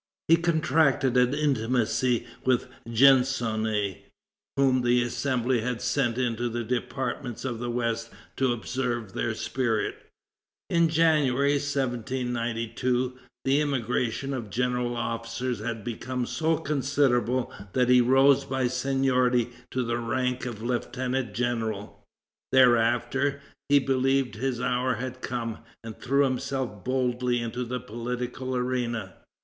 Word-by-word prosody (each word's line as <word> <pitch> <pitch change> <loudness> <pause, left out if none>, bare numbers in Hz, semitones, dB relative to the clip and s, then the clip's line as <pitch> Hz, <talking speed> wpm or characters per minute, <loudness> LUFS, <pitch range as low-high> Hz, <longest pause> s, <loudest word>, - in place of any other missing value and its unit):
He 165 - +7
contracted 160 -5 +2
an 125 +2 +4
intimacy 125 -3 +1 0.2
with 130 0 +2 0.2
Gensonné, 115 -5 +3 0.6
whom 130 -2 +3
the 120 0 +3
Assembly 125 -1 0
had 125 0 -2
sent 125 -2 0
into 120 -1 0
the 120 +1 -3
departments 125 +1 -3
of 120 -3 -3
the 120 0 -3
west 115 -1 -1 0.3
to 130 -2 +2
observe 120 -3 -3
their - - -1
spirit. 115 -4 -2 0.6
In 170 -1 +4
January, 150 -4 +3
1792, 125 -2 -2 0.3
the 135 +2 +3
emigration 130 -1 -1
of 120 -5 -4
general 125 +1 -1
officers 115 +2 -3
had 110 -2 -4
become 125 +2 -3
so 160 +3 0
considerable 135 -4 +1 0.2
that 125 -1 +3
he 125 0 +7
rose 135 +2 +5
by 135 -1 -1
seniority 125 -1 +1 0.2
to 130 - -1
the 120 0 -1
rank 125 +1 -1
of 110 -3 -6
lieutenant 125 -1 -2
general. 110 -4 -2 0.5
Thereafter, 125 +2 +3 0.3
he 145 - +6
believed 135 -2 +1
his 120 +2 -2
hour 125 +1 0
had 130 +2 -6
come, 115 -3 -3 0.2
and 115 -1 -7
threw 140 +2 +3
himself 130 -5 -2
boldly 125 -1 0
into 120 +1 -3
the 125 +1 -3
political 125 +3 -4
arena. 120 -5 -2
125 Hz, 120 wpm, -27 LUFS, 120-130 Hz, 0.6 s, He